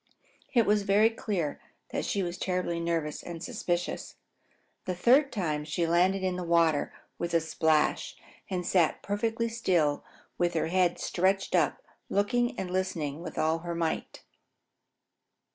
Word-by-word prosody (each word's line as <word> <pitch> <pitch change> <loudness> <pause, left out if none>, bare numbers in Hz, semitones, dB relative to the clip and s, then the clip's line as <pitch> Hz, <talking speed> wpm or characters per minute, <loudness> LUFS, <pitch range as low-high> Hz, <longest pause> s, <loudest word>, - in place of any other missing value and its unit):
It 235 -4 +4
was 210 0 +3
very 205 +3 +4
clear 195 -9 -3 0.3
that - - -2
she 200 - 0
was 175 +1 -4
terribly 180 -2 -1
nervous 165 -3 -2
and 170 0 -7
suspicious. 180 -7 -3 0.7
The 185 - -2
third 265 +9 +4
time 155 -8 -1
she 155 +3 -1
landed 180 +3 +2
in 185 -1 0
the 180 - -3
water 165 -3 +2 0.3
with 170 0 -2
a - - +6
splash 160 -1 +1 0.3
and 180 -2 -2
sat 170 -4 +2
perfectly 225 +3 -1
still 180 -11 +1 0.4
with 175 -1 +1
her 160 0 0
head 180 -1 +2
stretched 190 +2 0
up, - - +2 0.3
looking 240 +4 +1
and 180 -1 -4
listening 170 -5 -2
with 170 - -7
all 160 +1 +1
her 170 0 -4
might. 165 -1 -3
180 Hz, 145 wpm, -29 LUFS, 165-200 Hz, 0.7 s, a